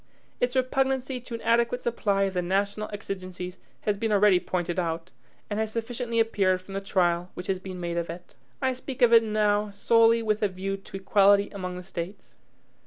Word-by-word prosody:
Its 245 +1 0
repugnancy 265 0 0
to 235 -1 -7
an 230 - -7
adequate 235 +1 +2
supply 205 -5 0
of 195 -1 0
the 180 - 0
national 200 +4 -1
exigencies 185 -3 -6 0.2
has 210 -1 0
been 225 +1 -1
already 205 -2 +5
pointed 175 -1 -2
out, 165 +1 -3 0.4
and 210 0 -3
has 220 -1 -1
sufficiently 230 +1 -2
appeared 195 -5 +2
from 185 +1 -12
the 195 - -2
trial 180 -2 +1
which 180 - -6
has 190 -1 -1
been 185 -1 -7
made 170 -1 -3
of 170 -1 -2
it. 175 +2 -9 0.3
I 260 0 +2
speak 255 0 -4
of 235 -1 +6
it 230 - +9
now 210 -1 +1
solely 230 +3 +4
with 215 0 0
a 210 - +3
view 195 +1 -4
to 195 0 -9
equality 200 +1 +4
among 185 -3 -5
the 180 - -7
States. 180 +1 -7
200 Hz, 195 wpm, -27 LUFS, 185-230 Hz, 0.4 s, it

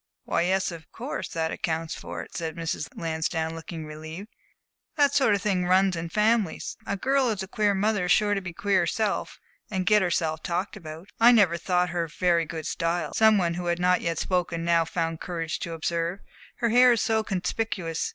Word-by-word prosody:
"Why, - - 0
yes, 190 +2 +1
of 165 -2 -11
course, 250 +5 -5
that 160 -1 -2
accounts 165 0 -2
for 85 -1 -6
it," - - -15
said 160 -2 -3
Mrs. 165 -3 -3
Lansdowne, 160 0 -2
looking 165 0 -7
relieved. 160 +6 -8 0.7
"That 285 -2 +3
sort 265 -7 +4
of 200 - -4
thing 190 -4 +1
runs 185 0 +4
in 165 0 -4
families. 215 -1 +1
A 200 - -1
girl 270 +6 +2
who - - +2
has 210 -3 -2
a - - -7
queer 205 0 +1
mother 205 -1 +1
is 180 - 0
sure 210 -1 +4
to 200 - -1
be 180 -2 -6
queer 200 +2 +1
herself 200 +5 -1 0.3
and 190 -3 -2
get 210 +3 +5
herself 160 -3 0
talked 185 +5 -2
about." 165 -1 -9
"I 235 +2 +8
never 200 -8 +5
thought 180 +1 +1
her 170 -1 -1
very 170 +1 +1
good 160 -1 -6
style," 170 +1 -1
some 220 -1 +5
one 170 -3 +1
who 175 0 -4
had 170 0 +1
not 180 +1 +2
yet 165 -1 -1
spoken 175 -2 -1
now 170 -1 +3
found 165 -1 -2
courage 165 -3 -3
to 170 - -5
observe. 170 +3 -2 0.3
"Her 235 -2 0
hair 245 +2 +6
is 230 - 0
so 220 -1 +1
conspicuous. 190 -4 -2
180 Hz, 205 wpm, -26 LUFS, 165-205 Hz, 0.7 s, I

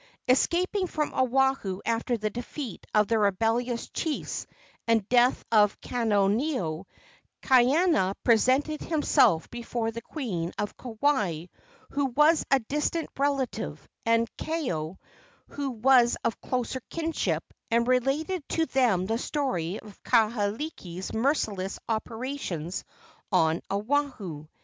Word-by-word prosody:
Escaping 365 +9 +2
from 305 -3 -2
Oahu 260 -6 +1
after 230 +1 0
the 215 -1 -2
defeat 245 +1 -6
of 210 -1 +3
the 225 -1 +2
rebellious 225 +4 +1
chiefs 315 -3 -3 0.4
and 225 -3 +2
death 245 +1 +3
of 210 -2 +4
Kaneoneo, 205 - 0 0.6
Kaiana 260 - +4
presented 260 +6 +3
himself 290 - +3
before 235 -1 -3
the 230 +1 -6
queen 195 - -4
of 205 - -3
Kauai, 220 - 0 0.5
who 285 0 0
was 300 +5 +4
a 275 - +6
distant 300 +7 -2
relative, 260 - -2 0.2
and 230 0 +3
Kaeo, 190 - -3 0.5
who 285 -1 -3
was 245 0 +4
of 230 - -1
closer 255 0 -2
kinship, 330 -1 -1 0.3
and 235 +1 +2
related 275 +8 +1
to 325 - +1
them 240 - +2
the 225 +3 -1
story 205 - -2
of 210 -2 -14
Kahekili's 215 - 0
merciless 220 -6 0
operations 225 - -3 0.5
on 160 +1 +3
Oahu. 205 - -2
235 Hz, 110 wpm, -27 LUFS, 205-275 Hz, 0.6 s, a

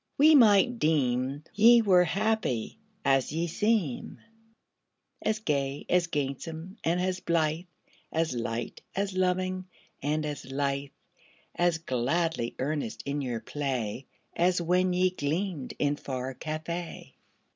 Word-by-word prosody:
we 310 +3 +7
might 235 -2 +6
deem 135 - +1
Ye 235 +3 +7
were 185 -5 +5
happy 210 - -1 0.3
as 135 -1 +3
ye 165 +3 -1
seem 190 - 0 1.0
As 215 0 0
gay, 140 -8 -2
as 180 -1 +3
gamesome, 160 - -4
and 170 +2 +1
as 185 0 -1
blithe, 165 -1 0 0.5
As 160 -3 0
light, 115 -1 -4
as 195 0 -1
loving, 185 0 0 0.3
and 150 +2 0
as 150 -2 -5
lithe, 140 0 -1 0.6
As 175 -2 +2
gladly 155 -1 -1
earnest 140 -3 -3
in 145 +1 -2
your 120 -4 -3
play, 130 -4 -3 0.3
As 180 +1 +3
when 180 +2 +2
ye 180 +1 +2
gleamed 165 -1 -3
in 145 0 +1
far 130 -1 -4
Cathay. 160 +4 -5
160 Hz, 125 wpm, -28 LUFS, 140-185 Hz, 1.0 s, we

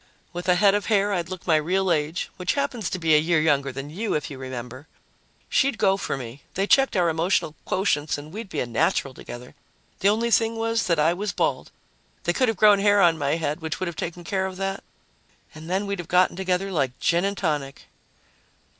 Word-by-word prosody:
"With 175 +1 -4
a 180 - +5
head 195 +1 +5
of 205 0 -1
hair, 205 -2 +2
I'd 175 -2 -2
look 185 -2 -7
my 160 -3 +4
real 185 +4 +1
age, 155 +2 -1
which 180 -1 -1
happens 250 - -2
to - - -3
be 165 -3 +2
a 150 - +7
year 165 +1 +2
younger 140 -3 +2
than 135 +3 -7
you, 210 +7 -2
if 150 0 -3
you 135 - -8
remember. 130 +2 -7 0.6
She'd 270 -4 +1
go 195 -1 +3
for 195 - -3
me 125 +1 -8
they 195 - +1
checked 270 0 +3
our 175 -1 +3
emotional 165 -1 0
quotients 150 -7 0
and 150 +3 -10
we'd 215 -1 -7
be - - -2
a - - -1
natural 120 +3 0
together. 125 0 -10 0.5
The 195 - +4
only 230 +3 +1
thing 225 0 +3
was 225 0 0
that 170 -2 +2
I 155 +3 +3
was 200 +1 -3
bald. 140 -7 -1 0.5
They 175 - +1
could 255 +7 +2
have 225 -3 0
grown 205 0 +6
hair 205 0 +4
on 170 -3 +5
my 140 +1 +1
head, 160 0 -2
which 160 0 -4
would 185 - -1
have 170 -2 -5
taken 175 +2 -5
care 190 0 -1
of 185 -1 -8
that, 195 0 -3 0.7
and 155 +2 -10
then 190 +3 0
we'd 200 -1 -3
have 175 - -6
gotten 180 0 +3
together 190 +1 -1
like 135 -7 -1
gin 170 +1 +2
and 200 0 -1
tonic." 145 -6 -2
175 Hz, 225 wpm, -24 LUFS, 150-200 Hz, 0.7 s, a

